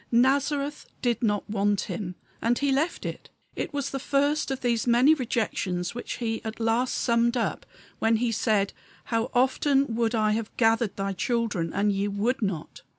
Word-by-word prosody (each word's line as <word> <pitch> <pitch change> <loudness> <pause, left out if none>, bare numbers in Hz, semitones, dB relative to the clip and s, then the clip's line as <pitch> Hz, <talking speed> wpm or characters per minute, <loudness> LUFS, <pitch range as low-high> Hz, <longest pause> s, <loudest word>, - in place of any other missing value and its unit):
Nazareth 280 +4 +2 0.2
did 240 -3 +1
not 205 -3 0
want 205 -1 +1
Him; 180 -5 -5 0.3
and 235 +1 +2
he 280 -1 +1
left 300 +6 0
it. - - -6 0.3
It - - -3
was 285 -2 -2
the 270 - -3
first 285 +3 +1
of 270 -1 -3
those 235 -1 0
many 245 +6 +6
rejections 210 - -1
which 240 - -5
He 225 -2 -3
at 220 0 -6
last 230 +3 +1
summed 235 0 +2
up 235 - -2 0.3
when 225 0 +3
he 235 +1 +1
said, 210 -3 +1 0.4
"How 230 +2 +1
often 265 +1 +2
would 230 0 +1
I 215 -1 +2
have 220 0 -3
gathered 225 -2 +2
thy 195 0 -2
children, 205 -5 -1
and 205 +1 +1
ye 200 +1 0
would 210 +6 0
not." 195 -7 -3
230 Hz, 175 wpm, -26 LUFS, 210-255 Hz, 0.4 s, many